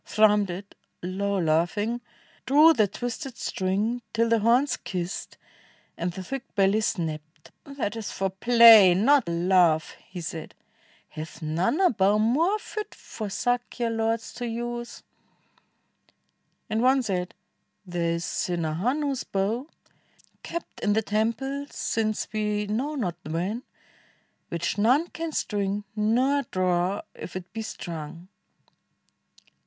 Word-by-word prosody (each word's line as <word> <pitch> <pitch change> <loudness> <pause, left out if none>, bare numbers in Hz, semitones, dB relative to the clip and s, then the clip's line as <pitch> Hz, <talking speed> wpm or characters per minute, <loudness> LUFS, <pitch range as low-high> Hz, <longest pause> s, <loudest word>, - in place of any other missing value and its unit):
Thrummed 210 -2 +3
it 190 +3 -7 0.2
— - - -37
low 200 +2 -1
laughing 180 +8 +1 0.2
— - - -31
drew 305 +4 +7
the 215 -8 +3
twisted 245 +5 -5
string 205 +6 -1
Till 230 0 +2
the 230 0 +4
horns 245 +5 +3
kissed, 180 -1 -5 0.6
and 175 +1 -2
the 185 +2 -7
thick 270 +7 -7
belly 200 +1 +3
snapped: 155 -5 -4
"That 275 -7 -4
is 225 -2 -5
for 195 -1 -2
play, 225 -2 +8
not 250 +2 +4
love," 170 -2 +3
he 180 - -7
said; 165 -1 -6 0.5
"hath 155 +1 -8
none 170 - 0
A 375 -2 +5
bow 200 -2 +3
more 295 - +2
fit 425 0 -7
for 215 -3 -7
Sakya 245 +2 -1
lords 225 0 -1
to 245 - -4
use?" 240 +1 -5 1.6
And 220 +1 0
one 260 +1 +4
said, 180 -4 -2 0.5
"There 170 -2 -1
is 170 - -4
Sinhahanu's 205 - -1
bow. 215 +8 -1 0.7
Kept 340 0 -6
in 205 - +1
the 220 +1 +1
temple 235 +7 -1
since 215 -1 -1
we 210 -1 0
know 250 +9 -2
not 180 - -2
when. 175 +9 -2 0.9
Which 170 +4 -2
none 260 +11 +3
can 330 0 -5
string, 205 -6 -1
nor 250 +7 +2
draw 185 +1 0
if 180 - -9
it 185 0 -7
be 225 - -4
strung." 170 -4 -7
210 Hz, 130 wpm, -26 LUFS, 180-240 Hz, 1.6 s, play